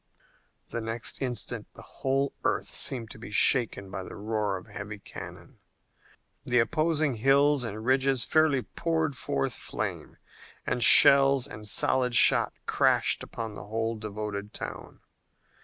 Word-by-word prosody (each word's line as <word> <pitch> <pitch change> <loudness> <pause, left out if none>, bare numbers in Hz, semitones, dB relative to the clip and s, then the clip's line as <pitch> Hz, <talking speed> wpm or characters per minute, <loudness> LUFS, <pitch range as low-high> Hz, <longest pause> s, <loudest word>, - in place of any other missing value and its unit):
The 115 - -4
next 115 +3 -3
instant 120 -3 -4
the - - -10
whole 135 +1 -2
earth - - -1
seemed 115 -4 -1
to - - -11
be 115 - -9
shaken 105 -3 +2
by 95 - -5
the - - -9
roar 105 -2 -2
of 90 - -12
heavy 105 +1 -8
cannon. 100 - -11 0.8
The 125 - 0
opposing 155 +1 +1
hills 140 +3 +3
and 110 -1 -6
ridges 130 0 +2
fairly 155 -5 +2
poured 160 -4 -2
forth 70 - -2
flame, - - -6 0.5
and 125 -1 -1
shells 135 +2 +7
and 105 -6 -7
solid 125 +3 +1
shot - - +5
crashed - - +2
upon 115 -2 -6
the 100 - -9
whole 115 +2 -2
devoted 105 -1 -6
town. - - -8
120 Hz, 140 wpm, -27 LUFS, 105-135 Hz, 0.8 s, shells